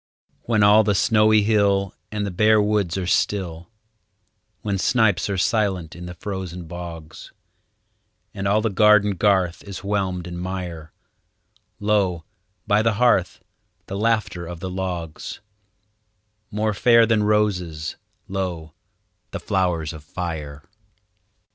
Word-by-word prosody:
When 110 -3 +2
all 105 +2 +6
the 100 -1 +1
snowy 110 +1 +4
hill 100 -2 +2 0.2
And 105 -1 -2
the 100 - -3
bare 110 +4 +4
woods 105 -4 +1
are 95 - -2
still; 90 -2 -1 0.9
When 100 -2 -1
snipes 105 -5 +2
are 100 - -1
silent 100 -5 0
in 90 0 -8
the 90 - -8
frozen 90 -2 -6
bogs, 85 -2 -9 1.0
And 100 0 -3
all 105 +2 +3
the 110 -1 0
garden 105 +1 +5
garth 95 -2 +1
is 100 -1 -8
whelmed 95 -3 -1
in 85 0 -6
mire, 90 -4 -5 0.9
Lo, 100 -6 +1 0.4
by 105 0 +3
the 110 0 +2
hearth, 105 -7 +2 0.4
the 95 - -6
laughter 105 -5 0
of 85 -1 -7
the 95 +1 -5
logs— 90 -4 -5 1.1
More 105 0 -1
fair 115 +2 +5
than 110 -1 +2
roses, 90 -7 0 0.3
lo, 90 -5 -4 0.6
the - - -5
flowers 85 -5 -1
of 80 -2 -10
fire! 75 -3 -6
95 Hz, 130 wpm, -22 LUFS, 85-105 Hz, 1.1 s, all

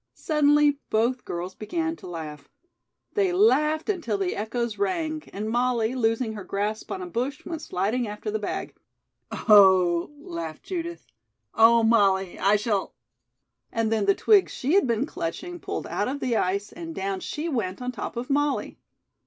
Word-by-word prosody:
Suddenly 295 -2 +3
both 240 +3 +1
girls 175 +2 -4
began 325 - -3
to - - -11
laugh. 155 -4 -7 0.6
They 395 -3 +2
laughed 315 -6 +3
until 335 - -1
the 195 -2 -1
echoes 230 +2 -3
rang, 330 -6 -1
and 210 +2 -4
Molly, 240 0 +1
losing 225 -2 0
her 210 -2 -7
grasp 205 +3 -3
on 380 -1 -4
a - - -4
bush, 275 -4 -3
went 325 -2 -5
sliding 225 +1 -1
after 210 - -5
the 435 - -1
bag. - - -4 0.6
"Oh," 190 -5 +5
laughed 165 - -6
Judith, 340 -2 -5 0.5
"oh, 230 +1 +6
Molly, 195 -5 +3
I 200 +2 +4
shall 210 -2 -1 0.4
" - - -53
and 225 -1 0
then 220 -2 +1
the 200 - +5
twigs 415 -4 +4
she 275 +5 -1
had 395 -7 +4
been 235 +2 +1
clutching 345 - -5
pulled - - -4
out - - -2
of 275 +3 -3
the 250 -4 0
ice 200 0 0
and 330 -1 -8
down 195 0 -2
she 300 - -4
went 220 - -2
on 250 0 -3
top 245 - -6
of 245 +1 -3
Molly. 290 0 0
235 Hz, 170 wpm, -25 LUFS, 200-310 Hz, 0.6 s, oh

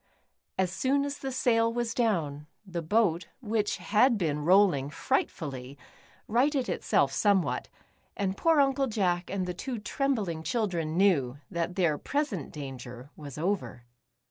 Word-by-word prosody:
As 185 -1 +1
soon 270 +9 +1
as 285 0 -4
the 270 - -4
sail 230 -2 +2
was 235 -1 -2
down, 155 - 0 0.2
the 175 -3 -4
boat, 175 -1 +1
which 215 -4 -1
had 230 +3 +3
been 155 -6 0
rolling 180 -6 +4
frightfully, 140 -3 -2 0.5
righted 260 +4 +2
itself - - +1
somewhat, 200 -4 +1 0.5
and 195 -1 -1
poor 325 +6 +3
Uncle 275 -1 +3
Jack 185 -6 0
and 190 -2 -1
the 180 - -3
two 245 +7 -4
trembling 210 - -1
children 170 -6 -1
knew 145 -10 +3
that 170 +1 -2
their 170 -6 +2
present 280 - -2
danger 130 -2 -8
was 145 -3 -9
over. 175 -7 -2
190 Hz, 140 wpm, -29 LUFS, 160-235 Hz, 0.5 s, rolling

